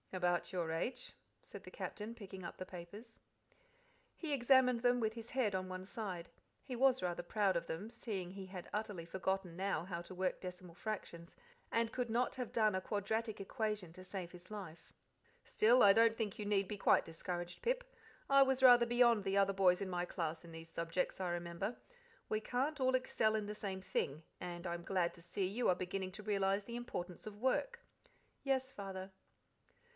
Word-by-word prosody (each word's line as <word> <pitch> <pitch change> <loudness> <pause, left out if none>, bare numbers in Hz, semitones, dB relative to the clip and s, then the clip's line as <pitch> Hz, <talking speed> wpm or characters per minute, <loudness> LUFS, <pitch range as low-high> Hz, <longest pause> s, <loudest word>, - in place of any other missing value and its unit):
"About 175 -1 +1
your 175 -4 -1
age," 165 +10 -2 0.3
said - - -10
the - - -10
Captain, 215 +2 -5
picking 190 -4 -9
up 170 - -6
the 185 - -5
papers. 200 +7 -10 1.0
He 315 -4 -2
examined 250 -2 +5
them 245 0 +4
with 220 -2 +1
his 230 0 -8
head 250 -6 +1
on 185 0 -2
one 185 0 -5
side. 190 -5 -4 0.3
He 255 - -5
was 260 -1 +4
rather 175 -1 -1
proud 195 +1 +2
of 170 - -1
them, 190 +7 -4
seeing 205 -6 -4
he 195 0 -7
had 185 -2 -7
utterly 205 -5 -3
forgotten 190 0 -2
now 190 -3 -1
how 170 -2 -4
to 185 +2 -10
work 185 0 -1
decimal 180 -1 -7
fractions, 175 -5 -5 0.3
and 230 0 +1
could 250 -2 -1
not 240 +3 +1
have 250 -3 -4
done 215 -2 +3
a 185 - 0
quadratic 220 +2 -1
equation 210 -4 -2
to 185 - -10
save 185 -2 -5
his 180 0 -13
life. 185 -6 -8 0.5
"Still, 240 +4 +5
I 200 - +9
don't 225 +1 +5
think 215 -4 -2
you 210 - -3
need 200 -2 +2
be 210 - -4
quite - - +4
discouraged, 175 +1 -5
Pip. - - +1 0.5
I 275 0 +7
was 265 -1 +4
rather 245 -2 +9
beyond 235 -3 +5
the 195 0 +1
other 195 0 +4
boys 185 -1 +4
in 195 - -2
my 175 -1 -1
class 165 -2 -3
in 170 - -11
these 165 0 -9
subjects, 170 +3 -2
I 180 - 0
remember. 175 +5 -3 0.5
We 215 0 0
can't 270 +6 -1
all 260 0 +4
excel 220 -4 +2
in 215 -1 0
the 210 +1 -5
same 195 -2 -4
thing, 155 -4 -2 0.2
and 175 -1 -5
I'm 170 -1 -3
glad 180 -2 +1
to 170 - -14
see 175 +3 -2
you 225 +6 +1
are 180 - +5
beginning 185 +1 -3
to 210 - -8
realize 200 -1 +1
the 235 - -6
importance 185 -7 -5
of 210 -1 -7
work." 475 - 0 0.6
"Yes, 265 -1 +1
Father." 195 -2 -6
195 Hz, 195 wpm, -37 LUFS, 180-230 Hz, 1.0 s, I